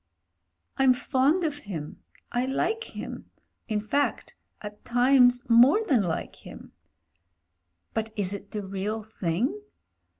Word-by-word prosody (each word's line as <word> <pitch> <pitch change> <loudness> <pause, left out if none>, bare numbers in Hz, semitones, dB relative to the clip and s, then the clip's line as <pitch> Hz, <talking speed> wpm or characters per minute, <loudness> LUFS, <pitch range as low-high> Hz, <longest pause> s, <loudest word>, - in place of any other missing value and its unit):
'*I'm 265 -1 +5
fond 270 +7 +1
of 295 -2 -2
him; 170 - -7 0.3
I 245 +1 0
like 445 - -1
him - - -7 0.2
— - - -51
in 215 -1 0
fact 280 +7 -1 0.2
at 210 0 -10
times 245 0 +4
more 255 - +6
than 260 - +3
like 170 -4 -3
him. - - -12 1.2
But 220 0 -2
is 200 -2 -1
it 200 0 -8
the 210 -2 -5
real 200 +3 -3
thing? 220 - -2
240 Hz, 130 wpm, -27 LUFS, 205-270 Hz, 1.2 s, more